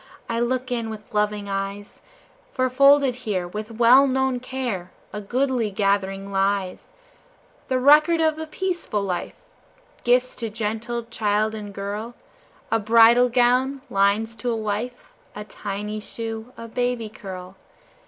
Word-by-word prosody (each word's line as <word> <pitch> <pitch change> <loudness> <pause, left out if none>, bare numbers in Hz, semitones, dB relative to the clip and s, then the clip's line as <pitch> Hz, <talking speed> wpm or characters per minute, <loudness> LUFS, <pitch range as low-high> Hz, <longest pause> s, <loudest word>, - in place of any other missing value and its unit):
I 230 0 -1
look 255 +1 -1
in 230 -2 -2
with 215 -1 -9
loving 210 -1 0
eyes, 195 +1 -5 0.5
For 255 -1 0
folded 275 0 +5
here, 200 -8 -2
with 210 +4 -6
well 240 +4 +6
known 265 -1 0
care, 245 -8 -4 0.2
A 210 - -4
goodly 250 +1 0
gathering 195 -1 -1
lies, 195 -1 -1 0.8
The 260 - +1
record 300 +5 +5
of 315 -1 +2
a 315 - -5
peaceful 345 - -2
life 180 -3 -3 0.7
Gifts 250 +1 +2
to 230 -2 -3
gentle 225 +2 -3
child 215 -2 0
and 210 -2 -7
girl, 205 +4 -5 0.6
A 225 - +3
bridal 230 +3 +6
gown, 255 +3 +2
lines 200 +3 +2
to 240 +4 -3
a 235 - 0
wife, 220 +3 -4 0.2
A 210 - -6
tiny 210 0 -5
shoe, 225 +2 -6
a 230 - -8
baby 245 -1 -1
curl. 190 -3 -9
225 Hz, 140 wpm, -23 LUFS, 205-250 Hz, 0.8 s, well